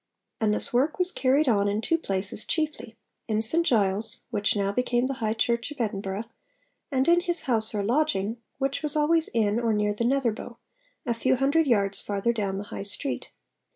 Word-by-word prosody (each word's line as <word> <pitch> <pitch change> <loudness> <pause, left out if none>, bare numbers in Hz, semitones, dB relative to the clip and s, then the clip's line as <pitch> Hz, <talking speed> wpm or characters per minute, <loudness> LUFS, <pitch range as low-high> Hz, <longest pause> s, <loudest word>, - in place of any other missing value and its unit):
And 220 -2 +2
this 210 - 0
work 270 +6 +2
was 365 0 +3
carried 270 +2 +2
on 205 -4 +3
in 205 +1 0
two 330 +9 +1
places 195 -4 -3
chiefly; 305 -8 -3 0.3
in 215 -2 0
St 320 +10 +4
Giles, 220 - +1
which 205 -2 +1
now 200 -1 0
became 245 +2 0
the 270 - -1
High 220 0 0
Church 235 +2 0
of 295 - -10
Edinburgh, 200 -2 -2 0.7
and 265 0 +1
in 345 +1 +6
his 350 -2 -2
house 225 -3 0
or 205 - 0
lodging, 230 -3 0 0.2
which 270 0 -1
was 300 -1 -2
always 315 +2 +3
in 220 -1 +1
or 230 -2 +1
near 210 0 +1
the 210 - -3
Netherbow, 245 -2 -1 0.5
a 240 - +1
few 260 +3 +1
hundred 280 +5 +2
yards 200 -5 +2
farther 205 +3 -1
down 200 -4 -2
the 200 - -4
High - - -4
Street. 140 -10 -5
230 Hz, 190 wpm, -26 LUFS, 205-275 Hz, 0.7 s, in